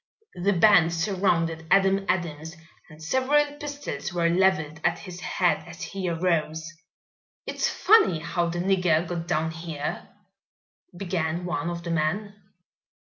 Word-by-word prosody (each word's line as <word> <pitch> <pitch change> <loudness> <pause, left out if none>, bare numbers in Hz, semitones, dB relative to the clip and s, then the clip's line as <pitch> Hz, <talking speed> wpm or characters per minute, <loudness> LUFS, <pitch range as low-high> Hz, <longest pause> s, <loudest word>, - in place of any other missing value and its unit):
The 200 +3 +3
band 175 -2 +5
surrounded 165 -3 0
Adam 195 0 +3
Adams 160 -2 -2 0.3
and 155 0 -13
several 260 - +2
pistols 285 - -5
were 170 -1 +1
leveled 170 -4 +1
at 175 - +1
his 180 -2 -9
head 180 0 0
as 170 +1 -9
he 185 +2 -4
arose. 165 -1 -1 0.7
"It's - - -1
funny 420 - +4
how 170 +2 -1
the 170 - -4
nigger 180 -3 +2
got 170 -1 -4
down 160 -2 0
here 160 -3 -5 0.4
" - - -25
began 175 -2 -2
one 170 -2 -2
of 170 0 -5
the 170 - -4
men. 165 +6 -1
175 Hz, 140 wpm, -25 LUFS, 160-190 Hz, 0.7 s, band